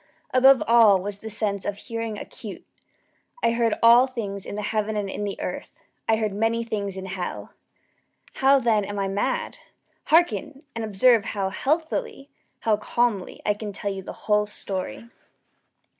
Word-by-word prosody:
Above 265 +1 +6
all 225 -4 +6
was 200 +1 -5
the 220 - -7
sense 205 -2 -1
of 205 - -3
hearing 230 -1 -5
acute. 215 -1 -9 0.8
I 230 - +4
heard 230 -2 +1
all 240 +3 +7
things 205 -6 -5
in - - -5
the 210 - -4
heaven 215 0 -1
and 205 -1 -1
in 205 - -4
the 200 - -5
earth. - - -6 0.3
I 225 - +5
heard 215 -2 -1
many 225 +3 0
things 200 -4 -3
in 190 - -6
hell. 185 -1 -5 0.8
How, 275 +1 +5
then, 230 -5 +2
am 205 +1 -5
I 195 -1 0
mad? 475 - -2 0.5
Hearken! 310 -3 +2
and 230 - -4
observe 220 +2 +4
how 195 -2 -2
healthily 315 - -2 0.3
how 215 -2 +2
calmly 215 -3 -1
I 210 - +3
can 210 0 -6
tell 200 0 -4
you 195 - -6
the - - -8
whole 210 -1 +2
story. 195 +2 -5
215 Hz, 165 wpm, -24 LUFS, 200-235 Hz, 0.8 s, all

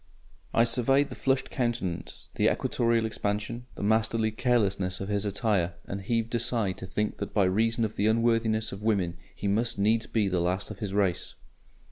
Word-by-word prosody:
I 115 - +4
surveyed 130 +4 +3
the - - -7
flushed 135 0 0
countenance, 120 -9 -3
the - - +3
equatorial 115 -1 +1
expansion, 110 +2 -3
the - - -6
masterly 110 +1 +2
carelessness 100 -6 +1
of 95 - -5
his 105 0 0
attire, 100 -4 0
and 100 0 -5
heaved 115 +3 -1
a 120 - +2
sigh 115 -4 +1
to 95 0 -8
think 105 +3 -2
that 100 - -6
by 100 - +4
reason 115 +5 +2
of 110 - -6
the 105 - +2
unworthiness 110 -1 +2
of 100 - -7
women 95 -6 0 0.2
he 100 - -3
must 115 +3 +1
needs 110 +3 +2
be 110 -3 +1
the 90 -2 0
last 90 +4 -1
of 105 - -9
his 100 -2 -3
race. 95 -4 0
110 Hz, 185 wpm, -28 LUFS, 100-115 Hz, 0.2 s, I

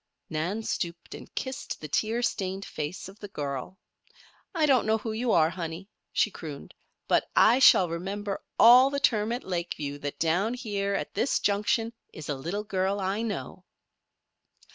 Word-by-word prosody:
Nan 175 +8 -2
stooped 170 -4 -4
and - - -10
kissed 260 -1 -4
the 155 - -7
tear 225 - 0
stained 195 -3 -2
face 155 +5 -5
of 195 +3 -13
the 205 - -7
child. 145 0 -5 0.8
"I 320 -2 +3
don't 265 -6 +3
know 220 0 +3
who 225 0 -5
you 230 +2 -1
are, 160 0 +4
honey," 175 +2 -6 0.2
she 215 - +2
crooned, 150 -6 -8 0.3
"but - - +2
I 240 +4 +6
shall 190 -8 +7
remember 195 +4 -4 0.2
all 250 +3 +8
the 280 0 -2
term 220 -4 +2
at 245 +2 -3
Lakeview 170 -6 -4
that 145 0 -5
down 180 +9 +1
here 200 -5 -2
at - - -3
this 270 - +1
junction 210 +3 +1 0.2
is 155 -2 -9
a 145 - 0
little 170 +10 -4
girl 195 -1 -1
I 195 +3 -1
know." 205 -4 -5
195 Hz, 165 wpm, -28 LUFS, 170-225 Hz, 0.8 s, all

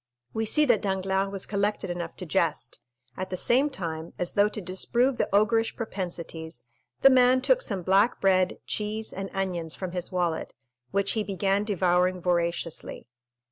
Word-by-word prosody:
We 220 0 -1
see 300 +6 +4
that 240 -7 +3
Danglars 190 0 0
was 195 -2 -3
collected 205 -2 -1
enough 170 -1 -5
to 185 - -7
jest; 165 -2 -1 0.4
at 185 0 -4
the 185 - -3
same 260 +9 +3
time, 165 - -5
as 180 - -1
though 205 0 +4
to 215 - -5
disprove 235 +7 0
the - - 0
ogreish 215 +3 +2
propensities, 170 - -5 0.4
the 270 - +9
man 255 0 +5
took - - +3
some 195 - -1
black 195 +6 +3
bread, 185 -1 +2
cheese, 215 +1 -3
and 195 +1 -5
onions 175 -4 -2
from 185 -2 -5
his 180 +1 -3
wallet, 175 -3 -1 0.3
which 200 0 +1
he 220 - 0
began 195 0 0
devouring 180 -2 +2
voraciously. 170 -6 -2
195 Hz, 165 wpm, -27 LUFS, 180-215 Hz, 0.4 s, the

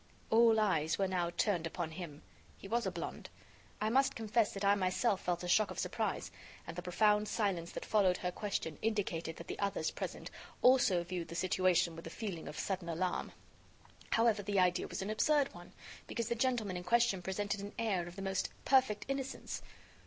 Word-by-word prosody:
All 225 0 +6
eyes 165 -7 +2
were 195 - +1
now 180 -2 0
turned 175 -2 0
upon 165 -1 -4
him. 160 -3 -8 0.3
He - - -10
was 235 +3 0
a - - -1
blonde. - - -6 0.5
I 215 +1 0
must 270 +2 +3
confess 225 0 +1
that 200 0 -2
I 200 - +6
myself 195 +2 +1
felt 175 0 -1
a - - -3
shock 210 +4 +4
of - - -7
surprise, - - -2 0.3
and - - -7
the 180 - -4
profound 210 +4 +3
silence 190 -7 -1
that - - -5
followed 195 -4 +3
her 180 - -2
question 180 -6 -3
indicated 190 -7 -1
that 170 - -9
the - - -6
others 200 -5 0
present - - -6 0.3
also 245 -9 +5
viewed 175 -1 -4
the 170 - -8
situation 180 -2 +2
with 165 - -8
a - - -5
feeling 195 -8 -5
of 150 - -7
sudden 185 -3 -2
alarm. 175 +2 -1 0.8
However, 225 -2 +3
the 200 0 0
idea 180 -1 +2
was - - -4
an 205 - -3
absurd 285 +5 +2
one, - - -12 0.4
because 230 -1 -3
the - - +2
gentleman 235 -6 0
in 180 - -5
question 230 -1 +3
presented 200 +2 -2
an 200 +1 -7
air 200 -7 0
of 175 - -9
the 195 - -6
most 190 -1 -1 0.2
perfect 260 -6 +3
innocence. 270 -1 -4
195 Hz, 195 wpm, -34 LUFS, 175-220 Hz, 0.8 s, All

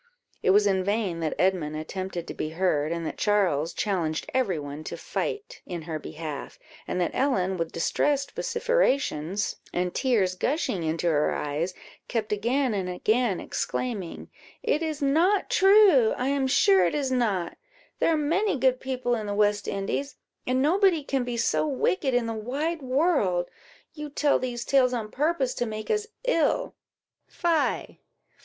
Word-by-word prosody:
It - - +1
was 205 +2 +5
in 190 -2 +2
vain 200 -4 -1
that 160 -2 -2
Edmund 180 -5 +1
attempted 175 +2 -5
to - - -5
be 155 - -3
heard, 155 -5 +1
and 170 -1 -3
that - - -5
Charles 180 -7 +2
challenged 165 -5 -1
every 240 -10 +1
one 145 +1 -6
to - - -5
fight 415 0 -4
in 175 -3 -6
her 160 -1 -4
behalf, 155 -1 -7 0.3
and - - -2
that 175 - 0
Ellen, 190 -9 +1
with 165 -2 -3
distressed 280 - 0
vociferation 470 - 0 0.4
and 180 0 -1
tears 220 -9 +1
gushing 205 - -1
into 160 +1 -2
her 150 -3 +2
eyes, 155 +5 -2 0.3
kept 220 -3 -2
again 240 +4 +1
and 190 -3 -2
again 215 +3 +1
exclaiming 210 -9 -4 0.3
"It 300 - +1
is 310 -2 -3
not 340 +9 +2
true 385 - +6
I 255 +2 -1
am 275 -1 +1
sure 195 -7 +5
it - - -2
is 275 -3 -1
not; 210 -9 0 0.4
there - - +3
are 320 - +2
many 335 +5 +1
good 255 -1 +2
people 255 -2 -2
in 220 -3 -2
the 205 - -2
West 205 0 +2
Indies, 200 +8 -3 0.3
and 255 +1 +2
nobody 355 0 +3
can 270 -2 -1
be 245 -1 -3
so 270 - +1
wicked 275 -1 0
in 245 -1 +2
the 225 - -2
wide 285 +9 -3
world. 255 - +1 0.4
You 300 -1 -7
tell 290 0 +2
these 240 -2 -4
tales 255 -2 +3
on 215 -3 -4
purpose 285 -3 0
to 240 - -2
make 215 0 -4
us 430 0 0 0.2
ill - - +1 0.5
fie! 330 -4 -1
235 Hz, 165 wpm, -26 LUFS, 180-285 Hz, 0.5 s, true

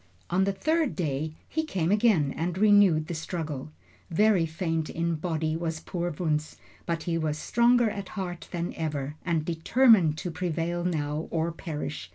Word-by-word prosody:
On 190 +2 +3
the 200 - +1
third 310 +9 0
day 155 -2 -2
he 315 - -1
came 185 - -1
again 205 -10 +3
and 175 +2 -2
renewed 200 -6 +5
the 170 - -5
struggle. 155 -3 -4 0.4
Very 190 -1 +3
faint 160 -1 -2
in 170 0 -1
body 160 -1 -1
was 165 -1 -3
poor 175 +1 -3
Wunzh, 155 -1 -2 0.3
but 165 -1 -1
he 165 -1 -1
was 155 -1 -1
stronger 240 +6 +3
at 200 -2 -6
heart 175 -3 -4
than 175 0 -3
ever, 150 -3 -3
and 165 -3 0
determined 175 0 +4
to 180 0 -4
prevail 175 0 -2
now 155 -3 -2
or 165 0 0
perish. 90 - -5
170 Hz, 165 wpm, -27 LUFS, 155-185 Hz, 0.4 s, renewed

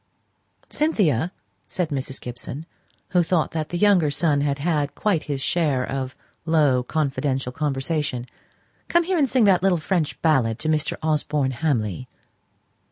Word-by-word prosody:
"Cynthia," 180 - +1 0.4
said 180 -4 -2
Mrs. 135 -2 -3
Gibson, 125 +5 -7 0.4
who 180 -1 +3
thought 170 -1 +1
that 155 -2 -3
the 175 - -2
younger 185 -5 +4
son 145 0 +1
had 140 -1 0
had 150 -2 -1
quite 200 -7 +1
his 140 -3 -3
share 145 -6 +1
of 135 0 -4 0.3
low, 150 -6 +3
confidential 135 -2 -1
conversation, 140 -2 -2 0.6
"come 345 0 +3
here, 360 0 0
and 275 -3 +3
sing 255 -1 +3
that 190 -4 +5
little 190 -2 +3
French 165 -1 -1
ballad 130 -9 +3
to 155 - -2
Mr. 155 -1 0
Osborne 150 -3 0
Hamley." 125 - -1
150 Hz, 145 wpm, -23 LUFS, 135-175 Hz, 0.6 s, that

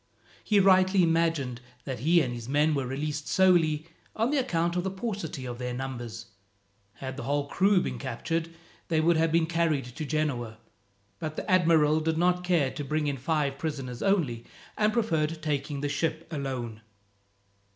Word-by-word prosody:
He 210 -2 +3
rightly 190 0 +5
imagined 165 -7 +1 0.2
that 130 -3 -5
he 165 +7 +4
and 125 -4 -2
his 120 0 -7
men 150 +2 +3
were 135 -3 -1
released 145 +2 -3
solely 165 -5 +3 0.3
on 230 +6 +1
account 175 - +1
of 180 - 0
the 190 - -1
paucity 190 - -4
of 120 -1 -6
their 125 -1 -3
numbers. 120 -3 -5 0.7
Had 130 0 -7
the - - -4
whole 145 +1 0
crew 190 +5 +3
been - - -4
captured, 160 +6 -3 0.4
they 160 -2 +1
would 165 +2 +4
have 160 0 +2
been 165 0 +3
carried 160 -4 0
to 125 +6 -7
Genoa; 140 -7 -2 0.6
but 155 -1 -4
the - - -5
admiral 160 -4 +4
did 160 0 -1
not 180 +1 +2
care 170 -7 +2
to 145 - -5
bring 150 +2 -1
in 140 -1 -1
five 140 0 -1
prisoners 135 -6 -4
only, 150 - +1 0.3
and 210 0 +2
preferred 165 -9 0
taking 145 -1 -2
the 145 - 0
ship 160 +3 -2
alone. 130 -7 -4
155 Hz, 170 wpm, -28 LUFS, 135-170 Hz, 0.7 s, rightly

